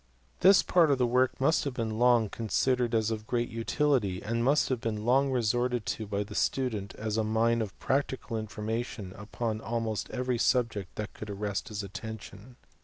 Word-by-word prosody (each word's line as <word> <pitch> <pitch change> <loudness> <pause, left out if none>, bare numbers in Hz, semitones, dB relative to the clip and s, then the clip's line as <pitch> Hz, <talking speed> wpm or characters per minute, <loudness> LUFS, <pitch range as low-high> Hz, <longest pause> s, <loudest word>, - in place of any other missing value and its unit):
This 190 +2 +7
part 170 -4 +4
of 140 - +3
the 125 - +2
work 125 +2 +2
must 140 +5 +3
have 140 -3 -3
been 110 -2 -2
long 120 -2 +5
considered 120 +3 0
as 110 0 +1
of 110 -1 -4
great 120 -1 0
utility, 115 -4 0
and 115 +4 -2
must 140 +4 +3
have 130 -3 -1
been 110 -1 -3
long 135 +3 +3
resorted 120 -1 0
to 110 - -3
by 100 0 -1
the 105 +1 -10
student 110 -5 -1
as 110 0 -3
a 110 - +2
mine 115 +2 +2
of 105 -4 -5
practical 130 -3 -1
information 110 -2 -4
upon 110 +1 -4
almost 115 0 -2
every 125 -1 -1
subject 115 -8 +1
that 105 -1 -5
could 110 - -8
ar 100 - -4
rest 100 +3 -3
his 105 -3 -4
attention. 105 +4 -8
115 Hz, 185 wpm, -29 LUFS, 105-125 Hz, -, This